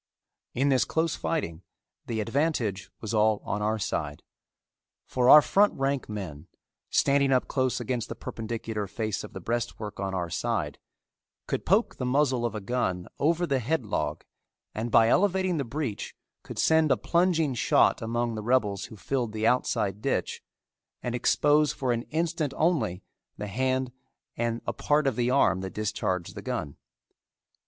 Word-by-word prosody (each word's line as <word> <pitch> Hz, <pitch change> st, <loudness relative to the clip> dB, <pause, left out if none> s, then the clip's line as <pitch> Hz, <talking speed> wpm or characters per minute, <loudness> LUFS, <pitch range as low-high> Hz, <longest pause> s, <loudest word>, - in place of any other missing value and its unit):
In 135 Hz, +3 st, +2 dB
this 130 Hz, -2 st, +4 dB
close 160 Hz, +1 st, 0 dB
fighting 85 Hz, -, -2 dB, 0.5 s
the 110 Hz, -2 st, -1 dB
advantage 115 Hz, -, -1 dB
was 110 Hz, 0 st, -4 dB
all 110 Hz, -1 st, +3 dB
on 105 Hz, -, -2 dB
our 110 Hz, +1 st, +1 dB
side, 75 Hz, -7 st, -3 dB, 0.8 s
for 125 Hz, -1 st, +1 dB
our 150 Hz, +1 st, +10 dB
front 205 Hz, +1 st, +3 dB
rank 135 Hz, -2 st, -1 dB
men, 90 Hz, -7 st, -6 dB, 0.4 s
standing 140 Hz, 0 st, +3 dB
up 130 Hz, -1 st, +2 dB
close 130 Hz, -2 st, 0 dB
against 125 Hz, -3 st, -3 dB
the -, -, -5 dB
perpendicular 110 Hz, -2 st, -4 dB
face 110 Hz, +1 st, -3 dB
of -, -, -10 dB
the -, -, -6 dB
breastwork 110 Hz, 0 st, -3 dB
on 95 Hz, -1 st, -2 dB
our 85 Hz, -2 st, -3 dB
side, -, -, -2 dB, 0.7 s
could -, -, -3 dB
poke 205 Hz, +7 st, +2 dB
the 125 Hz, -, -3 dB
muzzle 130 Hz, -3 st, +2 dB
of 115 Hz, -, -7 dB
a 105 Hz, -, -4 dB
gun 95 Hz, -5 st, -2 dB
over 170 Hz, +4 st, +2 dB
the 140 Hz, -5 st, +1 dB
headlog 125 Hz, -2 st, -2 dB, 0.5 s
and 110 Hz, +2 st, -3 dB
by 115 Hz, 0 st, +5 dB
elevating 185 Hz, -, +2 dB
the 140 Hz, -, 0 dB
breech 130 Hz, -3 st, -4 dB, 0.3 s
could -, -, -9 dB
send 160 Hz, -2 st, +4 dB
a -, -, +4 dB
plunging 170 Hz, -5 st, +2 dB
shot 120 Hz, -, +3 dB
among 120 Hz, +1 st, -1 dB
the 110 Hz, -, -4 dB
rebels 105 Hz, -4 st, +1 dB
who -, -, -11 dB
filled 120 Hz, 0 st, -2 dB
the 110 Hz, 0 st, -1 dB
outside 105 Hz, -5 st, +1 dB
ditch -, -, -1 dB, 0.6 s
and 120 Hz, -, -2 dB
expose 145 Hz, +4 st, +3 dB
for 130 Hz, -2 st, -1 dB
an 120 Hz, -1 st, 0 dB
instant 160 Hz, -3 st, -1 dB
only 115 Hz, -, +1 dB, 0.3 s
the 105 Hz, -, -4 dB
hand 130 Hz, +4 st, -1 dB, 0.4 s
and 115 Hz, 0 st, -2 dB
a -, -, -2 dB
part 150 Hz, 0 st, +1 dB
of 135 Hz, -4 st, +1 dB
the 120 Hz, +1 st, +1 dB
arm 95 Hz, -8 st, +3 dB
that 95 Hz, -1 st, -6 dB
discharged 95 Hz, -4 st, -2 dB
the -, -, -7 dB
gun. 70 Hz, -, -4 dB
120 Hz, 165 wpm, -27 LUFS, 105-140 Hz, 0.8 s, our